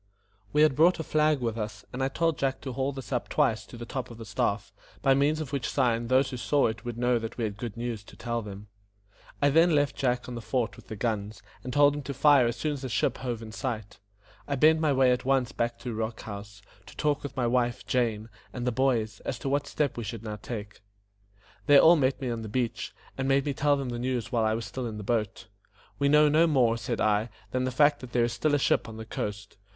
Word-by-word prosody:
We 150 +1 +4
had 155 -4 +4
brought 170 +4 +4
a - - -2
flag 155 -2 +2
with 115 -1 -2
us, 105 0 -5
and 125 - -4
I - - +2
told 160 0 0
Jack 135 0 0
to 130 - -5
haul 135 +2 -1
this 135 0 -9
up 125 -2 -2
twice 135 -8 +1
to 120 - -11
the 120 - -7
top 130 +2 -5
of 115 - -10
the 115 - -8
staff, 100 0 -1 0.3
by 135 -1 +5
means 145 +3 +2
of 150 -3 -5
which 135 -5 -1
sign 120 -3 +1
those 130 +2 +3
who 130 - -4
saw 145 +3 +2
it 110 0 -2
would 120 -2 -5
know 125 0 +2
that 115 0 -6
we 120 - -2
had 105 -2 -2
good 115 0 -6
news 115 -3 -4
to - - -14
tell 120 -1 -3
them. 100 -1 -9 0.8
I 145 - +5
then 165 +2 +5
left 145 -1 +2
Jack 125 -3 0
on 125 - -6
the 120 - -5
fort 110 -1 -1
with - - -16
the 110 - -6
guns, 105 -1 -3 0.2
and 125 - -5
told 145 +2 +5
him 145 - -4
to 140 0 -6
fire 140 -3 +5
as 120 - -1
soon 155 -1 -1
as 140 -2 -7
a 130 - -3
ship 115 - 0
hove 120 -3 -4
in 110 - -8
sight. 110 -4 -5 0.5
I 140 - -1
bent 155 +4 +5
my 155 -2 +2
way 130 -2 +4
at 125 0 0
once 135 -1 +1
back 120 -3 -2
to 120 - -4
Rock 110 +1 -3
House, 100 -1 -9 0.2
to - - -14
talk 150 -1 +1
with 145 - -7
my 125 - +1
wife, 120 0 0
Jane, 115 -4 0 0.2
and 125 -1 -5
the 125 - +1
boys, 120 -4 0
as 125 - -4
to 135 - -4
what 140 +1 0
steps 145 -5 -1
we 120 - -3
should 115 +1 -6
now 105 -1 -5
take. 105 -1 -7 0.9
They 145 - +8
all 165 +2 +8
met 135 -4 +1
me 130 -3 -2
on 115 -1 -3
the 110 - -6
beach, 120 0 -2 0.3
and 130 - 0
made 135 0 +3
me 145 - -1
tell 145 +1 +2
them 135 -2 -3
the 120 -1 -4
news 125 -1 -2
while 115 -3 +2
I 110 0 +2
was 115 - -4
still 130 -2 -4
in 110 -2 -6
the 105 - -6
boat. 110 -2 -1 0.5
"We 140 0 +3
know 150 +1 +6
no 155 +3 +4
more," 125 -7 +3
said 115 0 -3
I, 110 +2 +2 0.2
"than 130 0 0
the - - 0
fact 145 +2 +4
that 125 -2 -10
there 120 - +3
is 120 - 0
still 155 -2 +1
a - - +4
ship 130 - +1
on 110 - -9
the 110 - -7
coast. 105 -2 -5
125 Hz, 260 wpm, -28 LUFS, 115-140 Hz, 0.9 s, They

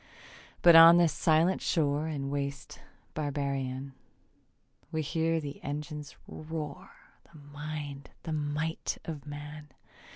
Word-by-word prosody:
But 170 -1 +9
on 165 +1 +10
this 170 -2 +4
silent 165 +2 +3
shore 150 -1 +1
And 140 -3 -3
waste 140 -1 -4 0.3
barbarian, 140 -2 -3 1.0
We 160 0 -1
hear 165 +2 0
the 145 -2 -7
engines 150 +1 -5
roar 155 -2 -6 0.4
And 145 -3 -15
mind 145 -1 -6
the 160 - -3
might 150 +2 -2
of 150 -3 -6
man. 150 +1 -8
150 Hz, 110 wpm, -30 LUFS, 145-160 Hz, 1.0 s, on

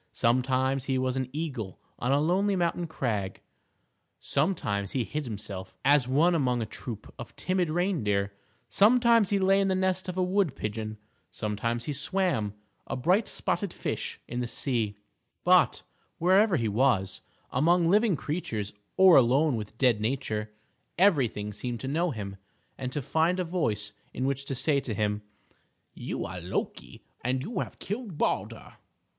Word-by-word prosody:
Sometimes 130 +2 +1
he 135 -1 0
was 130 0 0
an 130 -1 -2
eagle 135 - -4 0.2
on 125 - 0
a 140 - +4
lonely 190 +6 +2
mountain 175 -1 0
crag; 105 -11 -2 0.8
sometimes 100 - -1
he 130 - +1
hid 150 +6 -4
himself 100 -4 -6
as 140 -2 +5
one 155 +7 +4
among 125 -6 +1
a 115 - -1
troop 110 0 -8
of 120 - -9
timid 185 -2 0
reindeer; 115 - 0 0.3
sometimes 230 0 +5
he 200 - +2
lay 195 +1 +4
in 195 - +2
the 190 - +2
nest 185 0 0
of 180 - -5
a 185 - +2
wood 180 -5 +1
pigeon; 110 -1 -4 0.3
sometimes 115 +3 -2
he 150 - -2
swam, 140 - 0 0.3
a - - -3
bright 180 - +2
spotted 185 +1 -1
fish, - - -4
in 120 - -4
the 125 - -1
sea; 115 -5 -1 0.5
but, - - +4 0.3
wherever 185 +2 +4
he 115 -4 0
was, 105 -4 +1 0.3
among 170 +2 +3
living 205 +1 +4
creatures, 115 - -3 0.2
or 190 -3 +8
alone 135 +3 +4
with 110 0 -6
dead 120 -5 +3
nature, 110 -3 -2 0.5
everything 130 - +2
seemed 120 +3 -4
to 130 - -5
know 165 +6 +1
him, 100 -7 -5 0.4
and 130 -1 -4
to 145 +1 -3
find 165 +7 +1
a - - +1
voice 110 - -1 0.2
in 130 - -1
which 140 0 -1
to 135 - -3
say 140 +3 +2
to 115 -5 -4
him, 105 0 0 0.7
"You - - -4
are - - -6
Loki, - - -4 0.2
and 130 +2 0
you 205 +2 -3
have - - -4
killed 210 -5 -5
Baldur." - - -2
135 Hz, 160 wpm, -28 LUFS, 110-180 Hz, 0.8 s, or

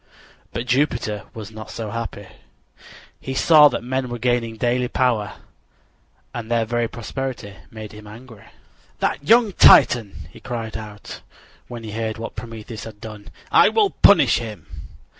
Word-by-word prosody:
But 120 - -4
Jupiter 120 -5 0
was 110 -1 -8
not 110 0 -10
so 110 -3 -6
happy. 115 -3 -5 0.9
He 130 - -6
saw 150 +1 +7
that 130 - -3
men 130 +1 -2
were 120 - -4
gaining 120 -2 -1
daily 120 +2 +1
greater 125 -1 -2
power, 115 -7 0 1.0
and 115 -2 -6
their 115 -1 +1
very 120 +1 -1
prosperity 120 -3 -6
made 110 -1 -9
him 105 0 -12
angry. 110 0 -13 0.5
"That - - -1
young 225 +6 +4
Titan!" 115 - +5
he - - -14
cried 115 -2 -6
out, 105 -2 -9 0.5
when 120 -2 -8
he 110 - -7
heard 110 0 -3
what 115 - -7
Prometheus 115 -1 -8
had 110 -2 -11
done. 105 -1 -10 0.2
"I - - +6
will 420 -3 +2
punish 140 - +5
him." 105 -8 -8
115 Hz, 155 wpm, -21 LUFS, 110-125 Hz, 1.0 s, saw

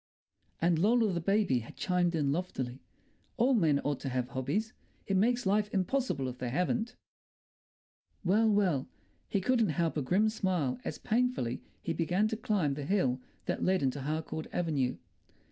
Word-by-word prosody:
And 170 -1 +2
Lola 220 +1 +3
the 170 - -1
baby 195 - +2
had 115 - -10
chimed 180 -2 +1
in 145 -3 +1
loftily, 135 -6 -3 0.6
"All 250 +3 +4
men 160 - +3
ought 145 -1 -1
to 135 - -4
have 125 -1 -1
hobbies. 150 - -2 0.3
It 195 - 0
makes 240 +5 +2
life 205 +2 +2
impossible 195 - 0
if 125 0 -6
they 125 - -2
haven't." 220 - -1 1.3
Well, 215 +5 +4
well! 185 -10 +2 0.4
He 200 - +1
couldn't 230 -1 +2
help 165 0 0
a - - +1
grim 190 +11 +2
smile 180 - -1
as 150 - -4
painfully 230 - 0 0.2
he 165 - -1
began 175 +6 +1
to 220 - -1
climb 200 -10 0
the 140 0 -5
hill 135 -9 +1 0.2
that - - -2
led 185 -4 +2
into 135 +1 0
Harcourt 155 +2 -3
Avenue. 145 -7 0
175 Hz, 160 wpm, -31 LUFS, 140-210 Hz, 1.3 s, All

